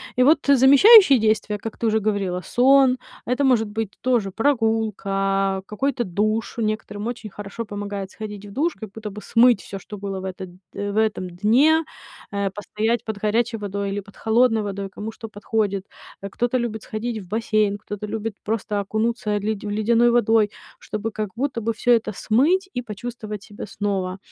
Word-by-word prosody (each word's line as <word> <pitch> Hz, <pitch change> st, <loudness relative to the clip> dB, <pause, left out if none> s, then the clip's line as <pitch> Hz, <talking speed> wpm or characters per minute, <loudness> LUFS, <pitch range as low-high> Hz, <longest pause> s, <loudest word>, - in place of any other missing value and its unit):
И 250 Hz, -, +4 dB
вот 300 Hz, +4 st, +5 dB
замещающие 280 Hz, -, +8 dB
действия, 215 Hz, -1 st, 0 dB
как 225 Hz, +1 st, -7 dB
ты -, -, -3 dB
уже 220 Hz, 0 st, +2 dB
говорила: 200 Hz, -4 st, -1 dB
сон, 260 Hz, +4 st, +4 dB, 0.3 s
это 250 Hz, +3 st, +1 dB
может 245 Hz, -5 st, +3 dB
быть 220 Hz, -1 st, -3 dB
тоже 235 Hz, -6 st, +1 dB
прогулка, 195 Hz, -5 st, 0 dB
какой-то 260 Hz, +3 st, -1 dB
душ. 215 Hz, +3 st, -1 dB
Некоторым 215 Hz, -2 st, -3 dB
очень 235 Hz, -2 st, -5 dB
хорошо 205 Hz, +3 st, -7 dB
помогает 205 Hz, -2 st, -5 dB
сходить 210 Hz, -1 st, -8 dB
в -, -, -11 dB
душ, 305 Hz, +10 st, 0 dB
как 220 Hz, -, -9 dB
будто 215 Hz, 0 st, -7 dB
бы 210 Hz, +2 st, -9 dB
смыть 235 Hz, -2 st, +4 dB
всё, 195 Hz, -, -7 dB
что 205 Hz, +2 st, -9 dB
было 195 Hz, -1 st, -4 dB
в 190 Hz, -, -7 dB
этот 190 Hz, 0 st, -6 dB, 0.2 s
э, 205 Hz, 0 st, -3 dB
в 205 Hz, -, -4 dB
этом 215 Hz, -4 st, 0 dB
дне. 250 Hz, -, +3 dB, 0.5 s
Э, 200 Hz, -1 st, -1 dB
постоять 215 Hz, +4 st, -2 dB
под 220 Hz, -2 st, -4 dB
горячей 225 Hz, +3 st, 0 dB
водой 200 Hz, -1 st, -3 dB
или 200 Hz, -, -2 dB
под 200 Hz, 0 st, -13 dB
холодной 225 Hz, 0 st, +2 dB
водой, 200 Hz, -1 st, -4 dB
кому 210 Hz, +3 st, -6 dB
что 225 Hz, 0 st, -9 dB
подходит. 205 Hz, -2 st, -2 dB, 0.4 s
Э, 200 Hz, -, -4 dB
кто-то 240 Hz, +5 st, 0 dB
любит 230 Hz, -3 st, -3 dB
сходить 220 Hz, +1 st, -4 dB
в 190 Hz, -, -11 dB
бассейн, 215 Hz, 0 st, 0 dB
кто-то 210 Hz, +1 st, -7 dB
любит 220 Hz, 0 st, -4 dB
просто 210 Hz, -1 st, -2 dB
окунуться, 220 Hz, +3 st, -1 dB
э, 205 Hz, -, +1 dB
ледь 210 Hz, 0 st, -3 dB
в 210 Hz, -, -4 dB
ледяной 230 Hz, +3 st, +3 dB
водой, 225 Hz, -2 st, +3 dB, 0.3 s
чтобы 220 Hz, +2 st, -4 dB
как 215 Hz, -1 st, -3 dB
будто 260 Hz, -1 st, -2 dB
бы 225 Hz, +1 st, -1 dB
всё 245 Hz, +2 st, +3 dB
это 225 Hz, -2 st, +1 dB
смыть 305 Hz, -, +2 dB
и 245 Hz, -, -2 dB
почувствовать 215 Hz, -2 st, -7 dB
себя 205 Hz, +1 st, -9 dB
снова. 195 Hz, -2 st, -2 dB
215 Hz, 185 wpm, -22 LUFS, 205-235 Hz, 0.5 s, замещающие